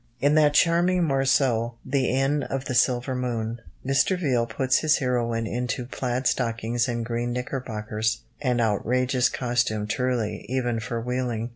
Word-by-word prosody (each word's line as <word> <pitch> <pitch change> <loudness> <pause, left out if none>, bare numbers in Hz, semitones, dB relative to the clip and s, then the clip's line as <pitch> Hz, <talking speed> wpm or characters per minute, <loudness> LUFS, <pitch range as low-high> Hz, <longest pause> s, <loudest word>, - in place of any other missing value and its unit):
In 145 +2 +3
that 150 -1 +4
charming 175 +2 +3
morceau, 135 -5 +2
The 130 0 +1
Inn 135 +3 +1
of 135 -1 -4
the 130 - -3
Silver 125 +1 +2
Moon, 120 -2 -3 0.2
Mr. 135 +7 +2
Viele 125 -8 +1
puts 130 +3 +1
his 155 0 +3
heroine 120 -4 0
into 125 +2 -2
plaid 125 0 -3
stockings 115 -1 0
and 120 -2 -2
green 120 +1 -2
knickerbockers 115 -4 -3 0.2
an 125 -4 +1
outrageous 125 +3 +1
costume 120 -4 0
truly, 120 -3 -1
even 120 -3 0
for 115 +1 -3
wheeling. 120 -1 -2
125 Hz, 145 wpm, -25 LUFS, 115-135 Hz, 0.2 s, that